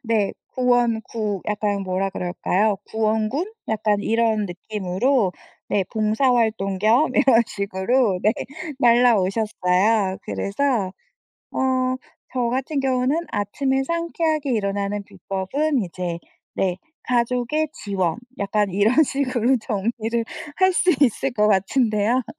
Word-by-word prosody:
네. 220 Hz, -4 st, +1 dB, 0.2 s
구원구 230 Hz, -5 st, 0 dB
약간 205 Hz, -1 st, -1 dB
뭐라 190 Hz, +1 st, -1 dB
그럴까요? 190 Hz, +3 st, 0 dB
구원군? 220 Hz, -, 0 dB, 0.2 s
약간 215 Hz, -1 st, +1 dB
이런 225 Hz, -2 st, +1 dB
느낌으로 195 Hz, +4 st, 0 dB, 0.4 s
네 200 Hz, -, +1 dB
봉사활동 220 Hz, -3 st, +1 dB
겸 235 Hz, +9 st, +3 dB
이런 260 Hz, -5 st, +5 dB
식으로 200 Hz, +1 st, 0 dB
네 215 Hz, -, +4 dB, 0.5 s
날아오셨어요. 215 Hz, -4 st, +3 dB
그래서 210 Hz, -3 st, -1 dB, 0.6 s
어 255 Hz, -1 st, +1 dB, 0.4 s
저 240 Hz, -2 st, +1 dB
같은 270 Hz, +3 st, -1 dB
경우는 270 Hz, +5 st, +1 dB
아침에 265 Hz, +7 st, 0 dB
상쾌하게 320 Hz, -3 st, -1 dB
일어나는 200 Hz, -1 st, -1 dB
비법은 200 Hz, -, -2 dB
이제 175 Hz, -1 st, -4 dB, 0.4 s
네. 185 Hz, -1 st, 0 dB, 0.3 s
가족의 250 Hz, +5 st, 0 dB
지원 190 Hz, -5 st, -2 dB, 0.2 s
약간 200 Hz, 0 st, 0 dB
이런 215 Hz, -, +4 dB
식으로 260 Hz, -3 st, +1 dB
정리를 225 Hz, +3 st, -2 dB, 0.3 s
할 375 Hz, -1 st, +3 dB
수 360 Hz, 0 st, +3 dB
있을 270 Hz, +1 st, +2 dB
것 210 Hz, -2 st, +2 dB
같은데요. 215 Hz, +3 st, +2 dB
220 Hz, 245 characters per minute, -22 LUFS, 200-255 Hz, 0.6 s, 이런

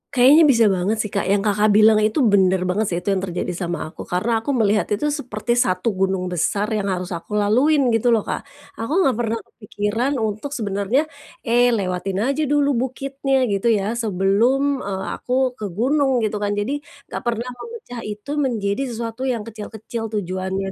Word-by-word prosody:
Kayaknya 270 Hz, +6 st, +7 dB
bisa 235 Hz, -5 st, +5 dB
banget 190 Hz, +3 st, 0 dB
sih, 210 Hz, -, -6 dB
Kak, 200 Hz, -, -1 dB
yang 200 Hz, +1 st, +2 dB
Kakak 210 Hz, 0 st, +2 dB
bilang 215 Hz, 0 st, +6 dB
itu 215 Hz, +6 st, +2 dB
benar 190 Hz, -4 st, +3 dB
banget 185 Hz, +4 st, 0 dB
sih, 170 Hz, -, -1 dB
itu 200 Hz, -, 0 dB
yang 195 Hz, -, +1 dB
terjadi 180 Hz, -1 st, -3 dB
sama 175 Hz, -2 st, -4 dB
aku. -, -, -10 dB
Karena 225 Hz, +6 st, 0 dB
aku 265 Hz, +5 st, -2 dB
melihat 210 Hz, -3 st, +2 dB
itu 295 Hz, +8 st, -1 dB
seperti 245 Hz, -6 st, -4 dB
satu 185 Hz, +1 st, +1 dB
gunung 190 Hz, -1 st, -1 dB
besar 200 Hz, +5 st, 0 dB
yang 210 Hz, -2 st, -1 dB
harus 185 Hz, -1 st, -3 dB
aku 175 Hz, +4 st, -5 dB
laluin, 250 Hz, +6 st, +3 dB
gitu 225 Hz, +1 st, +1 dB
loh, 215 Hz, -, 0 dB
Kak. -, -, -5 dB, 0.3 s
Aku 300 Hz, +12 st, +1 dB
nggak 265 Hz, -7 st, +2 dB
pernah 230 Hz, -1 st, 0 dB
kepikiran 220 Hz, +5 st, -3 dB
untuk 220 Hz, +4 st, -3 dB
sebenarnya, 205 Hz, +3 st, 0 dB, 0.4 s
"Eee, 245 Hz, 0 st, +3 dB
lewatin 190 Hz, 0 st, -2 dB
aja 275 Hz, +4 st, 0 dB
dulu 285 Hz, 0 st, +2 dB, 0.2 s
bukitnya, 270 Hz, 0 st, -1 dB
gitu 200 Hz, +3 st, 0 dB
ya, 220 Hz, +1 st, +1 dB
sebelum, 230 Hz, +7 st, +2 dB
eee, 195 Hz, -4 st, -4 dB, 0.2 s
aku 255 Hz, +1 st, +1 dB
ke 210 Hz, -, -3 dB
gunung." 265 Hz, +1 st, +2 dB
Gitu 215 Hz, -1 st, -1 dB
kan. 205 Hz, 0 st, -1 dB
Jadi 240 Hz, +8 st, -2 dB, 0.3 s
nggak -, -, -4 dB
pernah 235 Hz, +1 st, -1 dB
memecah 440 Hz, -, -8 dB
itu 210 Hz, +6 st, -7 dB
menjadi 225 Hz, -5 st, -1 dB
sesuatu 235 Hz, +2 st, -4 dB
yang 235 Hz, -4 st, -1 dB
kecil-kecil 220 Hz, +1 st, -6 dB
tujuannya 190 Hz, -2 st, -3 dB
220 Hz, 180 wpm, -21 LUFS, 200-250 Hz, 0.4 s, Kayaknya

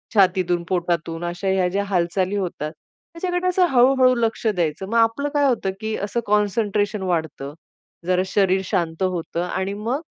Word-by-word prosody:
छातीतून 180 Hz, -3 st, +3 dB
पोटातून 170 Hz, -2 st, -1 dB
अशा 175 Hz, +3 st, -4 dB
ह्या 190 Hz, -1 st, +2 dB
ज्या 200 Hz, +2 st, -1 dB
हालचाली 185 Hz, 0 st, 0 dB
होतात. 170 Hz, -6 st, -3 dB, 0.4 s
त्याच्याकडे 355 Hz, +1 st, -2 dB
असं 365 Hz, 0 st, +3 dB
हळू-हळू 255 Hz, 0 st, +5 dB
लक्ष 230 Hz, -1 st, -1 dB
द्यायचं. 175 Hz, -3 st, -1 dB
मग 230 Hz, -, +1 dB
आपलं 230 Hz, +6 st, +2 dB
काय 290 Hz, -1 st, +3 dB
होतं, 220 Hz, -6 st, 0 dB
की 220 Hz, 0 st, -3 dB
असं 205 Hz, +4 st, -2 dB
कॉन्सन्ट्रेशन 210 Hz, 0 st, +1 dB
वाढतं, 160 Hz, -6 st, -2 dB, 0.5 s
जरा 185 Hz, 0 st, +3 dB
शरीर 190 Hz, -1 st, +2 dB
शांत 170 Hz, +1 st, -1 dB
होतं 175 Hz, -2 st, -2 dB
आणि 190 Hz, +2 st, -2 dB
मग 235 Hz, +8 st, -2 dB
195 Hz, 155 wpm, -22 LUFS, 175-225 Hz, 0.5 s, हळू-हळू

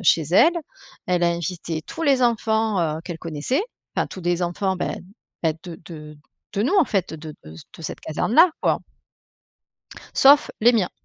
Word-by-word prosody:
chez 170 Hz, -3 st, +4 dB
elle. 320 Hz, -, +6 dB, 0.5 s
Elle 180 Hz, -1 st, +1 dB
a 175 Hz, -, +4 dB
invité 170 Hz, -1 st, -4 dB
tous 330 Hz, -, -7 dB
les 275 Hz, -4 st, +3 dB
enfants, 220 Hz, -4 st, +1 dB, 0.2 s
heu, -, -, -8 dB
qu'elle 170 Hz, -3 st, -6 dB
connaissait. 165 Hz, -, -2 dB, 0.3 s
Enfin -, -, +1 dB
tous 185 Hz, -, -9 dB
les 175 Hz, +1 st, 0 dB
enfants, 190 Hz, +2 st, -1 dB
bah -, -, -2 dB, 0.5 s
bah, 160 Hz, -, +2 dB
de 175 Hz, -3 st, -9 dB
de 150 Hz, -3 st, -10 dB, 0.4 s
de 205 Hz, -, +1 dB
nous, 315 Hz, -, +1 dB
en 375 Hz, -, +5 dB
fait, 195 Hz, -9 st, -1 dB
de 155 Hz, -1 st, -9 dB
de 75 Hz, -, -12 dB
de 80 Hz, -, -14 dB
cette 155 Hz, -, -6 dB
caserne 160 Hz, +8 st, -2 dB
là, 335 Hz, +5 st, +7 dB
quoi -, -, +2 dB, 1.4 s
sauf 285 Hz, +2 st, +6 dB
les 240 Hz, +3 st, +6 dB
miens. 215 Hz, -6 st, +1 dB
180 Hz, 180 wpm, -23 LUFS, 165-230 Hz, 1.4 s, là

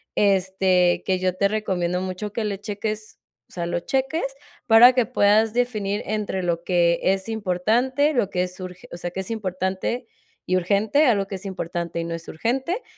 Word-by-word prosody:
este, 190 Hz, -2 st, +2 dB
que 185 Hz, -1 st, +1 dB
yo 185 Hz, -1 st, 0 dB
te 200 Hz, +2 st, +2 dB
recomiendo 180 Hz, -4 st, -1 dB
mucho 190 Hz, +3 st, -5 dB
que 230 Hz, -, -2 dB
le 200 Hz, -2 st, -3 dB
cheques, 215 Hz, +1 st, -5 dB, 0.3 s
o -, -, -24 dB
sea, 170 Hz, -1 st, -4 dB
lo 175 Hz, 0 st, -1 dB
cheques 270 Hz, -, -1 dB, 0.4 s
para 240 Hz, +3 st, +8 dB
que 250 Hz, -2 st, +2 dB
puedas 215 Hz, -2 st, +3 dB
definir 215 Hz, -5 st, -1 dB
entre 210 Hz, -3 st, -2 dB
lo 170 Hz, -1 st, -1 dB
que 170 Hz, -2 st, +2 dB
es 190 Hz, +1 st, +1 dB
importante, 225 Hz, +8 st, +1 dB
lo 235 Hz, -8 st, +1 dB
que 180 Hz, -2 st, 0 dB
es 180 Hz, +1 st, -7 dB
urge 185 Hz, -1 st, -9 dB
o -, -, -7 dB
sea, 175 Hz, 0 st, -4 dB
que 190 Hz, -, -4 dB
es 190 Hz, -, -6 dB
importante 190 Hz, +3 st, -2 dB, 0.4 s
y 185 Hz, -, +1 dB
urgente, 205 Hz, -, +2 dB
algo 205 Hz, -5 st, +3 dB
que 195 Hz, -, -5 dB
es 190 Hz, +2 st, -9 dB
importante 170 Hz, -3 st, -4 dB
y -, -, -2 dB
no 165 Hz, 0 st, -4 dB
es 165 Hz, 0 st, -7 dB
urgente, 265 Hz, -, -2 dB
195 Hz, 190 wpm, -23 LUFS, 180-220 Hz, 0.4 s, para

